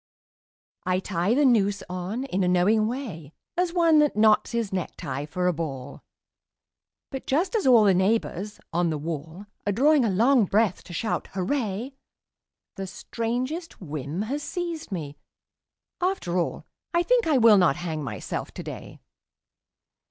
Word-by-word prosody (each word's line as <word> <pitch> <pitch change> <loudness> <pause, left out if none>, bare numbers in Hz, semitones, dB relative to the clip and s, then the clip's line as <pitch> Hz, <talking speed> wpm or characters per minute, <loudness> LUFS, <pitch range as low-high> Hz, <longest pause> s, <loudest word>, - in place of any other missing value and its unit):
I 185 0 +1
tie 190 +3 0
the 290 +1 +4
noose 205 -5 +3
on 185 +7 -4
in 195 -8 -1
a - - +2
knowing 200 +5 +3
way 200 - -6 0.2
As 360 -1 +1
one 335 -3 +4
that 295 -5 +3
knots 215 0 +4
his 230 -4 -2
necktie 145 -6 -4
for 180 +3 -2
a 180 - +3
ball; 140 -4 -5 1.1
But 270 -2 -6
just 325 - +1
as 415 -10 +1
all 240 -4 +7
the 200 -2 +5
neighbours 200 +1 0
on 175 0 +2
the 155 - -1
wall 160 +4 -6 0.2
Are - - +3
drawing 280 +6 +4
a 225 - +2
long 230 +4 +4
breath 205 0 +1
to 175 - -10
shout 220 +6 -2
'Hurray!' 220 +4 -2 0.8
The 195 0 -4
strangest 250 - -4
whim 155 +1 -4
has 275 +7 -3
seized 335 - -4
me... 150 -6 -5 0.8
After 360 - -1
all 170 - -3 0.3
I 345 - +4
think - - +2
I 300 -4 +4
will 225 -4 +7
not 175 -7 +4
hang 160 -3 -4
myself 105 -8 -5
today. - - -8
205 Hz, 150 wpm, -26 LUFS, 175-265 Hz, 1.1 s, all